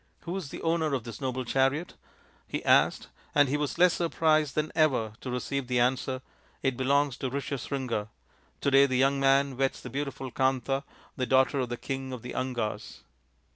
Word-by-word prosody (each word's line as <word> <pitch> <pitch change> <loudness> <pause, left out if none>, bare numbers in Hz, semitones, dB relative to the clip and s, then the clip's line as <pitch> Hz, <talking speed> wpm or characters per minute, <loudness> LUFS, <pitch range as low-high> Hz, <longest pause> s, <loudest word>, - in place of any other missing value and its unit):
" - - -41
Who 175 +2 -5
is 185 -7 -4
the - - -8
owner 165 -3 +1
of 125 - -3
this 115 -2 -8
noble 130 -1 -2
chariot? 135 +7 +1 0.3
" - - -31 0.2
he - - -4
asked, - - +3 0.3
and 145 -1 +6
he 135 - 0
was 150 +1 -2
less 180 0 +5
surprised 155 -3 +1
than 155 0 0
ever 135 -9 +2
to 130 - -5
receive 125 +1 -2
the 125 -1 +1
answer, 130 +1 0 0.2
" - - -34
It 135 -2 +1
belongs 140 +1 +1
to 130 - -3
Rishyasringa. 135 -4 -3 0.5
To 140 - +1
day 135 +1 +7
the 130 -2 0
young 135 +1 +3
man 135 -1 +3
weds 135 0 0
the 125 - -9
beautiful 135 -1 -4
Kanta, 130 +1 +1 0.4
the 130 -2 -1
daughter 130 +1 +3
of 125 -2 -1
the 120 - -3
King 135 0 -4
of 125 - -7
theAngas." 125 -3 -4
135 Hz, 195 wpm, -28 LUFS, 130-140 Hz, 0.5 s, day